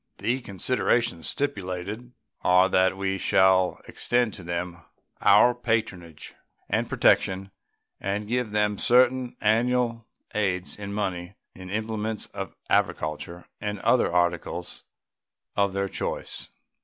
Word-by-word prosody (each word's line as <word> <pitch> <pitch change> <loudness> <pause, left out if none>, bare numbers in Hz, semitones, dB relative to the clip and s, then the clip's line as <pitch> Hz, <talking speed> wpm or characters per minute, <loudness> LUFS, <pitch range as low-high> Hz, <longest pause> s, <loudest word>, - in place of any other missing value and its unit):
The 120 +6 -1
considerations 115 -2 0
stipulated 105 -1 -4 0.3
are 90 +1 +5
that 95 +1 +3
we 95 0 -1
shall 95 -1 +3
extend 120 -2 0
to - - -8
them 85 0 -4 0.4
our 125 - +6
patronage 110 -9 -3 0.3
and - - 0
protection 95 +1 +2 0.5
and 100 +2 -2
give 125 0 -1
them 105 -1 0
certain 125 0 +3
annual 115 +1 +1 0.3
aids 95 -3 -1
in 100 -1 -7
money, 95 -2 -3 0.2
in 95 0 -10
implements 110 +1 -3
of 95 -1 -6
agriculture, 80 +3 -1 0.2
and 105 0 -3
other - - +3
articles 85 0 -1 0.7
of 100 -1 +2
their 100 0 -1
choice. - - -4
100 Hz, 115 wpm, -26 LUFS, 90-115 Hz, 0.7 s, our